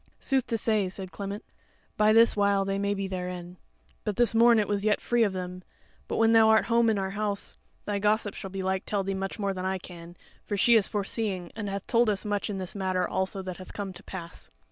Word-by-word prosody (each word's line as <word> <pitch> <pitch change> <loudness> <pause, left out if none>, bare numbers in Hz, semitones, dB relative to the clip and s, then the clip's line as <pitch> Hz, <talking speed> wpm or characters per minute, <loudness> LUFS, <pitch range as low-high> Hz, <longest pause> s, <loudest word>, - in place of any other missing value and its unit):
"Sooth 265 -3 0
to 230 - 0
say," 215 -3 +1
said 190 0 -7
Clement, 200 +2 -6 0.5
"by 215 0 +4
this 230 +1 +5
while 200 -1 +2
they 195 0 -1
may 200 0 0
be 195 -1 -3
therein; 180 -1 -5 0.5
but 210 - -2
this 240 0 +3
morn 230 +1 +6
it 210 -2 +2
was 205 -1 -1
yet 210 -1 +2
free 240 0 +1
of 215 -3 +3
them; 180 -1 -5 0.5
but - - -3
when 225 0 +4
thou 225 -1 +6
art 220 0 +5
home 235 -1 +3
in 220 - +1
our 190 -1 -2
house, 205 0 -3 0.3
thy 205 -1 -1
gossip 210 0 +1
shall 195 - -7
belike 190 0 -2
tell 200 -2 0
thee 195 0 -2
much 195 0 -4
more 200 -2 -1
than 185 -1 -5
I 190 0 -1
can; 175 -1 -11 0.3
for 205 - -3
she 235 +4 +5
is 220 -4 +5
foreseeing, 200 -3 -2
and 210 -2 -4
hath 195 0 -4
told 235 -1 +3
us 205 0 -1
much 205 0 -1
in 200 - -3
this 185 -1 -5
matter 185 -2 -1
also 190 +1 -2
that 185 -1 -6
hath 185 - -11
come 200 -2 -5
to 180 - -11
pass." 170 -3 -8
200 Hz, 235 wpm, -27 LUFS, 190-215 Hz, 0.5 s, morn